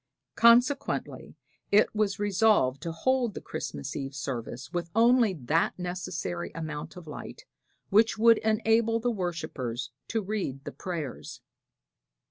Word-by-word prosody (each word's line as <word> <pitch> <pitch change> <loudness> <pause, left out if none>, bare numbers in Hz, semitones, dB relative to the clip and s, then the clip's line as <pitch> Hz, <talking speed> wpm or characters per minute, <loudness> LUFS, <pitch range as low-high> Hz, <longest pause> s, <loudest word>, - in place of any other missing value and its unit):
Consequently 240 +4 +3 0.4
it 205 +1 +4
was 210 -2 0
resolved 205 - +2
to 165 - -4
hold 245 +5 0
the - - -4
Christmas 70 -1 -6
Eve 135 0 -5
service 130 -1 -5
with 175 -1 -2
only 230 -3 +4
that 155 +4 0
necessary 175 - -4
amount 155 -2 -5
of 180 - -10
light 150 - -9 0.5
which 220 +3 +4
would 230 +1 +6
enable 225 +1 +2
the 240 +1 0
worshipers 150 - -4 0.2
to 225 -2 -1
read 190 -10 -3
the - - -6
prayers. 165 -8 -6
185 Hz, 125 wpm, -28 LUFS, 145-225 Hz, 0.5 s, would